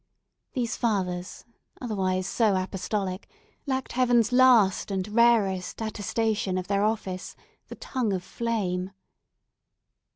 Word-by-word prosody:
These 240 -4 -1
fathers, 185 -5 -2 0.3
otherwise 190 -6 -1
so 210 +1 +2
apostolic, 190 0 -3 0.4
lacked 265 -1 -2
Heaven's 245 -2 +3
last 245 -8 +5
and 190 -1 -2
rarest 210 -5 +2
attestation 215 -2 -1
of 185 -1 -4
their 200 0 +1
office, 200 -4 -2 0.3
the - - -8
Tongue 250 -5 -2
of 185 -2 -2
Flame. 195 -5 -2
205 Hz, 105 wpm, -26 LUFS, 185-235 Hz, 0.4 s, last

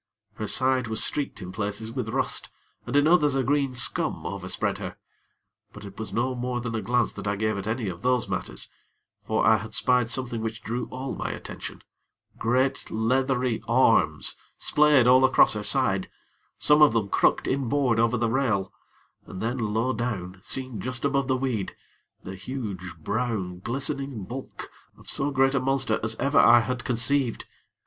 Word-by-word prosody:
Her 110 - -5
side 130 0 +2
was 110 0 0
streaked 145 -8 -1
in 90 - -7
places 105 +2 -4
with 120 -2 -4
rust, - - -1 0.4
and - - -3
in 145 0 +5
others 150 -5 +4
a 135 - +1
green 135 0 0
scum 120 - +1
overspread - - -3
her; - - -6 0.8
but 105 0 -10
it 100 +1 -11
was 110 - -5
no 125 +3 0
more 125 0 -3
than 120 -1 -4
a 110 - -2
glance 120 +1 +1
that - - -7
I 100 - 0
gave 110 +1 -1
at 100 +1 -5
any 115 0 -2
of 90 -2 -6
those 125 -2 +1
matters; - - -3 0.6
for - - 0
I - - +6
had - - -7
spied 125 -2 +2
something 125 -3 -2
which 110 -1 -5
drew 120 +2 -3
all 130 +1 -5
my - - -4
attention - - -8 0.6
great 130 +4 0
leathery 125 +1 0
arms 125 +3 +3 0.2
splayed 150 -4 +4
all 130 +1 +6
across 130 - +6
her - - -3
side, - - +1 0.5
some 150 +1 +4
of 150 -6 +7
them 110 -4 0
crooked - - +2
inboard 130 -2 +1
over 115 +1 +2
the 115 +1 +1
rail, 110 -6 0 0.5
and 95 - -8
then, 120 +5 -2
low 115 +3 0
down, 100 -6 -4
seen 130 -1 -2
just 130 +2 -4
above 140 -2 +1
the 130 -1 +1
weed, 125 -7 -2 0.5
the 95 - -7
huge, 95 -4 -6
brown, 100 0 -3
glistening 135 +1 -2
bulk 130 +7 -8 0.3
of - - -18
so 140 - +1
great 135 -1 +2
a 135 - +2
monster 130 -4 +1
as 110 0 0
ever 140 +3 +2
I 120 +1 +7
had 125 +1 -3
conceived. 125 +1 0
120 Hz, 175 wpm, -26 LUFS, 110-130 Hz, 0.8 s, of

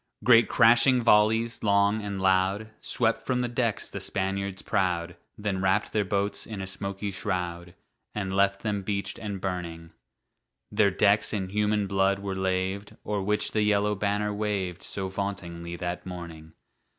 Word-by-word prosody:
Great 115 0 +6
crashing 120 +2 +5
volleys, 110 +2 +3
long 100 +1 +3
and 100 -1 -4
loud, 95 +3 +1
Swept 115 -1 0
from 125 -1 0
the 125 - 0
decks 120 -2 -1
the 100 - -6
Spaniards 95 0 -2
proud, 85 -3 0 0.2
Then 100 -3 -2
wrapped 95 +2 +1
their 105 - +2
boats 100 +1 -1
in 110 -3 -6
a 95 - -3
smoky 100 +1 -3
shroud, 90 -3 -4 0.4
And 95 -2 -2
left 100 0 +2
them 105 -2 -1
beached 100 0 -3
and 100 -3 -4
burning. 85 -3 -5 0.8
Their 105 -1 +4
decks 100 +3 +3
in 95 -3 -2
human 105 +1 +1
blood 95 0 +2
were 100 -1 -4
laved, 95 +1 -2
O'er 105 -1 -1
which 105 +2 0
the 110 - +1
yellow 105 0 +2
banner 105 +1 -1
waved 100 -4 -2
So 95 -1 -4
vauntingly 90 -3 -5
that 90 0 -4
morning. 85 -3 -8
100 Hz, 155 wpm, -27 LUFS, 95-105 Hz, 0.8 s, Great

